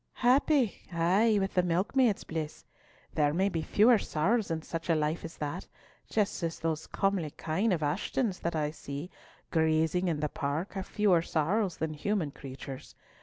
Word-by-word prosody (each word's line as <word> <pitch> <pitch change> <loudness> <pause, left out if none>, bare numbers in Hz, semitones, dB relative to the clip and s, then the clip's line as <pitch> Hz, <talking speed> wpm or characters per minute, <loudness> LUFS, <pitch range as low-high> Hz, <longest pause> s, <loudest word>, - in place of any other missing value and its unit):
"Happy—ay, 225 - +2
with 195 0 -1
the 180 - +4
milkmaid's 195 +7 +2
bliss. 160 -2 -5 0.5
There 150 0 +2
may 190 +3 +2
be 165 -4 -2
fewer 220 +6 +5
sorrows 200 +9 0
in 160 -1 -2
such 165 +1 -5
a 165 - +4
life 155 +2 -1
as 165 - -8
that—just 180 +6 -4
as 165 -1 -2
those 160 -1 -2
comely 195 -5 0
kine 165 +9 -1
of 165 -4 0
Ashton's 190 - -1
that 170 0 -2
I 150 -1 0
see 145 +3 -7 0.4
grazing 160 +2 +2
in 160 -4 0
the 150 - 0
park 150 +5 -3
have 190 -1 -4
fewer 200 -6 +3
sorrows 175 +5 0
than 160 0 -2
human 160 0 -1
creatures. 135 -1 -9
170 Hz, 160 wpm, -30 LUFS, 155-200 Hz, 0.5 s, fewer